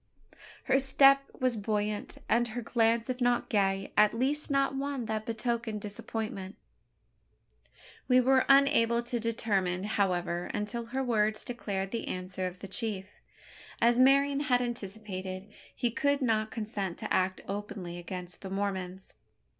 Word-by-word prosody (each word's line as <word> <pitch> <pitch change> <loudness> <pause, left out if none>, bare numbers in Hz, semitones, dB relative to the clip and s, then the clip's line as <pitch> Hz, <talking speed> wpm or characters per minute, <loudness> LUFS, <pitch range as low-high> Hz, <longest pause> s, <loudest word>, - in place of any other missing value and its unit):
Her 270 0 +3
step 275 +1 +6 0.2
was 255 -2 +1
buoyant; 210 0 -2
and 240 +1 +3
her 240 +1 -5
glance, 230 0 +2
if 255 0 -3
not 245 0 +2
gay, 195 -2 +1
at 210 +1 +5
least 280 +6 -1
not 275 -1 +2
one 275 -2 -2
that 215 0 -3
betokened 230 -1 -2
disappointment. 205 -1 -5 1.5
We 255 -1 +6
were 260 +1 +4
unable 275 -4 +5
to 240 0 -2
determine, 200 -5 0
however, 180 -4 0
until 230 +3 -3
her 265 +3 -2
words 215 -3 +1
declared 195 -5 -3
the 230 - -3
answer 185 0 -3
of 180 0 -9
the 195 - -6
chief. 200 -1 -2 0.7
As 235 +1 +4
Marian 275 +2 +5
had 270 -4 +2
anticipated, 195 -5 -5 0.3
he 240 -2 0
could 285 +4 +1
not 220 -3 +1
consent 210 -5 -4
to - - -3
act 185 0 +1
openly 195 -3 -5
against 180 0 -7
the 195 - -6
Mormons. 190 -1 -3
220 Hz, 140 wpm, -30 LUFS, 195-245 Hz, 1.5 s, step